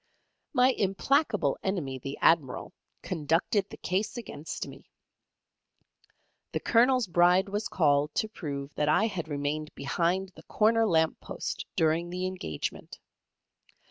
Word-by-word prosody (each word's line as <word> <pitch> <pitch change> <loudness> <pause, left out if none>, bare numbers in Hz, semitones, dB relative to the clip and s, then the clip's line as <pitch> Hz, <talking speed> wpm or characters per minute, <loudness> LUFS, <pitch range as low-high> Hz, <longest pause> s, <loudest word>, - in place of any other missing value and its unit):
My 255 -3 +4
implacable 210 - +1
enemy, 150 -9 -2
the 135 +2 -6
Admiral, 155 -6 +2 0.3
conducted 170 +5 0
the - - -10
case 190 +6 -2
against 165 -9 -6
me. - - -13 1.6
The - - 0
Colonel's 250 +1 +3
Bride 180 +2 +4
was 205 +2 -2
called 150 -3 +2
to 220 - +1
prove 145 -8 -6
that 150 0 0
I 155 +8 +4
had 185 -8 -3
remained 150 +1 -2
behind 175 +6 0
the - - -13
corner 225 +1 +3
lamp 160 -4 +2
post - - -5
during 165 +2 +1
the 180 +1 -3
engagement. 185 - -5
175 Hz, 125 wpm, -29 LUFS, 150-210 Hz, 1.6 s, My